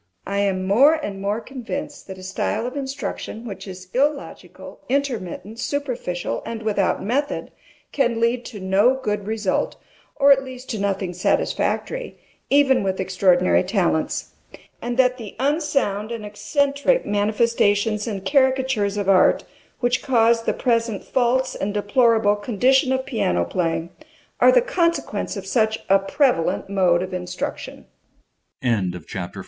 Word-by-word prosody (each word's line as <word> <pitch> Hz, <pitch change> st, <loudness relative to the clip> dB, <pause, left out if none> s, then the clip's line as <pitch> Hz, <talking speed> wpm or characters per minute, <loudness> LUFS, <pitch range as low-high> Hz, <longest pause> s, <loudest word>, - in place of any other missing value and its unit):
MRS. -, -, -46 dB, 0.2 s
SOLID. -, -, -5 dB
I -, -, 0 dB
am 190 Hz, -2 st, 0 dB
more 255 Hz, +11 st, +5 dB
and 205 Hz, -11 st, -5 dB
more 205 Hz, +2 st, -1 dB
convinced 250 Hz, -2 st, -6 dB
that 190 Hz, -1 st, -8 dB
a 185 Hz, -, -11 dB
style 190 Hz, +4 st, -2 dB
of 250 Hz, +2 st, -5 dB
instruction 265 Hz, -4 st, -5 dB
which 195 Hz, -3 st, -7 dB
is 185 Hz, -1 st, -9 dB
illogical, 280 Hz, +2 st, -3 dB
intermittent, 230 Hz, -6 st, -2 dB
superficial, 245 Hz, -, -3 dB
and 225 Hz, -1 st, -6 dB
without 205 Hz, -4 st, 0 dB
method, 270 Hz, +8 st, -2 dB, 0.4 s
can 240 Hz, -4 st, +1 dB
lead 235 Hz, +1 st, +1 dB
to 215 Hz, -, -8 dB
no 195 Hz, +7 st, +3 dB
good 210 Hz, -6 st, -3 dB
result, 215 Hz, -3 st, -1 dB, 0.4 s
or 280 Hz, -1 st, +5 dB
at 270 Hz, -1 st, +5 dB
least 260 Hz, 0 st, -8 dB
to 220 Hz, -, -3 dB
nothing 195 Hz, -2 st, -1 dB
satisfactory, 485 Hz, -, -1 dB, 0.3 s
even 275 Hz, -2 st, +4 dB
with 190 Hz, -1 st, -2 dB
extraordinary 185 Hz, -1 st, +3 dB
talents; 180 Hz, -5 st, -1 dB, 0.5 s
and 240 Hz, 0 st, -3 dB
that 255 Hz, -1 st, +3 dB
the 220 Hz, -4 st, -8 dB
unsound 275 Hz, -7 st, 0 dB
and 230 Hz, -2 st, -5 dB
eccentric 285 Hz, -, 0 dB
manifestations 210 Hz, 0 st, +1 dB
and 200 Hz, -3 st, -4 dB
caricatures 260 Hz, -7 st, +2 dB
of 200 Hz, -2 st, -2 dB
art, 190 Hz, -2 st, +4 dB, 0.4 s
which 245 Hz, 0 st, +1 dB
cause 230 Hz, -3 st, +3 dB
the -, -, +2 dB
present 230 Hz, -4 st, 0 dB
false 255 Hz, +1 st, +1 dB
and 205 Hz, +1 st, -3 dB
deplorable 215 Hz, 0 st, +3 dB
condition 255 Hz, +6 st, +2 dB
of 260 Hz, 0 st, 0 dB
piano 90 Hz, -, 0 dB
playing 165 Hz, -, -1 dB
225 Hz, 120 wpm, -22 LUFS, 200-260 Hz, 0.5 s, more